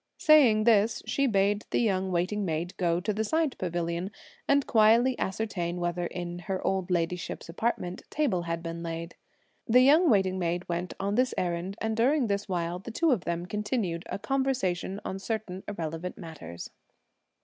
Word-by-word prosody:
Saying 290 Hz, -11 st, +6 dB
this, 220 Hz, -1 st, +3 dB
she 275 Hz, 0 st, +1 dB
bade 205 Hz, -1 st, +2 dB
the -, -, 0 dB
young 190 Hz, -4 st, +1 dB
waiting 185 Hz, +4 st, 0 dB
maid 170 Hz, 0 st, -2 dB
go 170 Hz, -2 st, +1 dB
to 205 Hz, +4 st, -1 dB
the 215 Hz, +2 st, -1 dB
side 315 Hz, +4 st, 0 dB
pavilion, 175 Hz, 0 st, -2 dB, 0.4 s
and 280 Hz, 0 st, +3 dB
quietly 230 Hz, +3 st, +4 dB
ascertain 185 Hz, -4 st, -2 dB
whether, 175 Hz, 0 st, -1 dB
in 175 Hz, 0 st, -5 dB
her 190 Hz, +1 st, -3 dB
old 190 Hz, -1 st, 0 dB
ladyship's 175 Hz, 0 st, -2 dB
apartment, 180 Hz, -1 st, -2 dB
table 270 Hz, -, 0 dB
had 165 Hz, 0 st, -3 dB
been 165 Hz, 0 st, -5 dB
laid. 165 Hz, 0 st, -5 dB, 0.5 s
The 250 Hz, +2 st, +6 dB
young 305 Hz, +6 st, +6 dB
waiting 190 Hz, -4 st, +2 dB
maid 175 Hz, 0 st, -1 dB
went 175 Hz, 0 st, -3 dB
on 200 Hz, +1 st, -1 dB
this 255 Hz, +3 st, +1 dB
errand, 180 Hz, +2 st, -2 dB
and 220 Hz, 0 st, -1 dB
during 260 Hz, +4 st, +3 dB
this 200 Hz, -1 st, -2 dB
while, 175 Hz, -1 st, -2 dB
the 195 Hz, -, -9 dB
two 315 Hz, +8 st, +2 dB
of 220 Hz, -9 st, 0 dB
them 170 Hz, 0 st, -2 dB
continued 210 Hz, -3 st, -2 dB
a -, -, -2 dB
conversation 225 Hz, -7 st, -1 dB
on 190 Hz, -, -4 dB
certain 195 Hz, -3 st, -4 dB
irrelevant 170 Hz, -2 st, -4 dB
matters. 155 Hz, -, -9 dB
190 Hz, 170 wpm, -28 LUFS, 175-225 Hz, 0.5 s, Saying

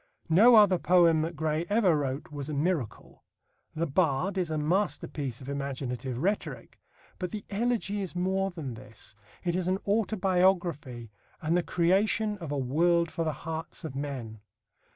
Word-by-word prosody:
No 220 Hz, +9 st, +7 dB
other 200 Hz, -4 st, +6 dB
poem 170 Hz, -3 st, +4 dB
that 165 Hz, +2 st, -3 dB
Gray 155 Hz, +1 st, -1 dB
ever 205 Hz, -5 st, +4 dB
wrote 140 Hz, 0 st, -3 dB
was 145 Hz, 0 st, -5 dB
a 150 Hz, -, -3 dB
miracle. 150 Hz, -, -2 dB, 0.5 s
The 165 Hz, +2 st, 0 dB
Bard 160 Hz, +3 st, +1 dB
is 180 Hz, -3 st, -1 dB
a 155 Hz, -, -1 dB
masterpiece 150 Hz, -, -1 dB
of 130 Hz, -, -10 dB
imaginative 135 Hz, -3 st, -4 dB
rhetoric. 195 Hz, +10 st, -3 dB, 0.4 s
But 180 Hz, -, -2 dB
the 210 Hz, +1 st, -6 dB
Elegy 210 Hz, -1 st, 0 dB
is 185 Hz, -2 st, -5 dB
more 190 Hz, +2 st, 0 dB
than 160 Hz, -9 st, -6 dB
this. 110 Hz, -1 st, -9 dB, 0.3 s
It 175 Hz, -1 st, 0 dB
is 180 Hz, -1 st, -1 dB
an 185 Hz, +1 st, +2 dB
autobiography 180 Hz, -, +1 dB, 0.3 s
and 160 Hz, +2 st, 0 dB
the 180 Hz, -, +3 dB
creation 200 Hz, +5 st, +1 dB
of 165 Hz, -5 st, -6 dB
a 145 Hz, -, -1 dB
world 170 Hz, +6 st, +2 dB
for 165 Hz, -, -2 dB
the 160 Hz, -, 0 dB
hearts 160 Hz, +1 st, -5 dB
of 155 Hz, -, -5 dB
men. 130 Hz, -6 st, -5 dB
170 Hz, 160 wpm, -29 LUFS, 140-190 Hz, 0.5 s, No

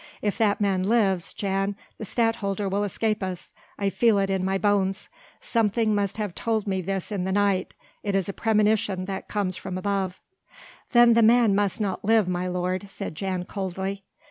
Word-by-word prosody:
If 205 Hz, -1 st, 0 dB
that 210 Hz, -2 st, +2 dB
man 195 Hz, -3 st, +1 dB
lives, 195 Hz, -3 st, +1 dB
Jan, 195 Hz, 0 st, -1 dB, 0.2 s
the 220 Hz, -, -5 dB
Stadtholder 210 Hz, -3 st, 0 dB
will 200 Hz, +2 st, 0 dB
escape 215 Hz, +2 st, -1 dB
us; 185 Hz, -2 st, -5 dB, 0.2 s
I 200 Hz, -1 st, 0 dB
feel 230 Hz, -1 st, +3 dB
it 195 Hz, 0 st, +1 dB
in 190 Hz, -1 st, 0 dB
my 190 Hz, +1 st, +1 dB
bones: 195 Hz, -1 st, 0 dB, 0.3 s
something 225 Hz, -1 st, +1 dB
must 200 Hz, -1 st, -1 dB
have 210 Hz, -4 st, -3 dB
told 220 Hz, 0 st, -1 dB
me 190 Hz, -2 st, -1 dB
this 190 Hz, +2 st, -3 dB
in 195 Hz, -3 st, -1 dB
the 190 Hz, -, -1 dB
night 200 Hz, -1 st, +1 dB, 0.3 s
it 200 Hz, -2 st, -2 dB
is 195 Hz, -3 st, +1 dB
a 200 Hz, -, -3 dB
premonition 210 Hz, -4 st, +1 dB
that 190 Hz, 0 st, -5 dB
comes 200 Hz, -3 st, -1 dB
from 185 Hz, -1 st, -5 dB
above." 190 Hz, -1 st, -2 dB, 0.7 s
"Then 240 Hz, -1 st, +7 dB
the 230 Hz, -, +4 dB
man 230 Hz, -1 st, +5 dB
must 205 Hz, +2 st, +1 dB
not 195 Hz, -4 st, -2 dB
live, 220 Hz, -1 st, +3 dB
my 180 Hz, 0 st, -1 dB
lord," 180 Hz, +2 st, -2 dB
said 195 Hz, -2 st, -6 dB
Jan 185 Hz, +1 st, -3 dB
coldly. 195 Hz, +1 st, -4 dB
200 Hz, 185 wpm, -25 LUFS, 190-210 Hz, 0.7 s, Then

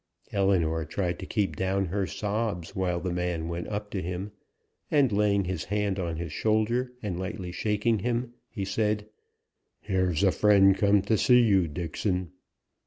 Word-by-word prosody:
Ellinor 90 Hz, -5 st, +1 dB
tried 90 Hz, +3 st, -2 dB
to 95 Hz, -, -7 dB
keep 105 Hz, -3 st, -1 dB
down 95 Hz, +1 st, 0 dB
her 95 Hz, +2 st, -1 dB
sobs 105 Hz, -5 st, -3 dB
while 90 Hz, -2 st, 0 dB
the 90 Hz, 0 st, -3 dB
man 90 Hz, -2 st, -2 dB
went 85 Hz, +1 st, -4 dB
up 105 Hz, 0 st, -4 dB
to 95 Hz, -, -2 dB
him, 90 Hz, +4 st, -4 dB, 0.6 s
and 140 Hz, -5 st, +3 dB
laying 100 Hz, -1 st, +2 dB
his 90 Hz, -3 st, -3 dB
hand 100 Hz, -1 st, -1 dB
on 85 Hz, -3 st, -2 dB
his 85 Hz, -3 st, -5 dB
shoulder, 110 Hz, -, +1 dB
and 95 Hz, -4 st, -3 dB
lightly 95 Hz, -1 st, -5 dB
shaking 105 Hz, +3 st, 0 dB
him, 120 Hz, +3 st, -2 dB, 0.2 s
he 100 Hz, -5 st, -4 dB
said: 105 Hz, +1 st, 0 dB, 0.7 s
"Here's 95 Hz, -3 st, 0 dB
a 95 Hz, -, +5 dB
friend 100 Hz, -2 st, +5 dB
come 100 Hz, -1 st, +3 dB
to 105 Hz, 0 st, +1 dB
see 125 Hz, -1 st, +6 dB
you, 95 Hz, -6 st, +3 dB
Dixon." 90 Hz, +3 st, -2 dB
100 Hz, 165 wpm, -27 LUFS, 90-105 Hz, 0.7 s, see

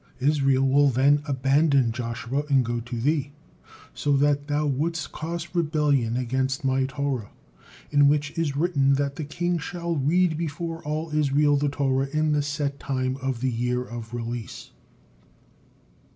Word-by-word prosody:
Israel 135 Hz, -1 st, +2 dB
will 140 Hz, +2 st, +4 dB
then 140 Hz, +3 st, +3 dB
abandon 135 Hz, -1 st, +2 dB
Joshua 120 Hz, +3 st, -3 dB
and 135 Hz, -3 st, +3 dB
go 120 Hz, 0 st, -2 dB
to 120 Hz, 0 st, -6 dB
thee, 140 Hz, +2 st, 0 dB, 0.6 s
so 145 Hz, -1 st, +1 dB
that 145 Hz, 0 st, +1 dB
thou 150 Hz, 0 st, 0 dB
wouldst 150 Hz, +3 st, -1 dB
cause 165 Hz, +1 st, -5 dB
rebellion 150 Hz, -8 st, +1 dB
against 130 Hz, +2 st, -1 dB
My 130 Hz, 0 st, +2 dB
Torah, 135 Hz, -5 st, -3 dB, 0.6 s
in 145 Hz, -1 st, +5 dB
which 145 Hz, 0 st, +1 dB
is 160 Hz, -4 st, -1 dB
written 145 Hz, -4 st, +2 dB
that 140 Hz, 0 st, -1 dB
the 155 Hz, -, -3 dB
king 175 Hz, +3 st, -1 dB
shall 170 Hz, +2 st, -3 dB
read 160 Hz, +3 st, +2 dB
before 165 Hz, +1 st, -4 dB
all 155 Hz, +1 st, -3 dB
Israel 145 Hz, 0 st, +3 dB
the 145 Hz, 0 st, +1 dB
Torah 135 Hz, -1 st, 0 dB
in 155 Hz, 0 st, +1 dB
the 150 Hz, -1 st, +2 dB
set 145 Hz, -1 st, -3 dB
time 130 Hz, -1 st, -2 dB
of 130 Hz, -3 st, -2 dB
the 130 Hz, 0 st, +1 dB
year 125 Hz, +1 st, -1 dB
of 120 Hz, -2 st, -8 dB
release." 120 Hz, -1 st, -6 dB
140 Hz, 150 wpm, -25 LUFS, 130-150 Hz, 0.6 s, in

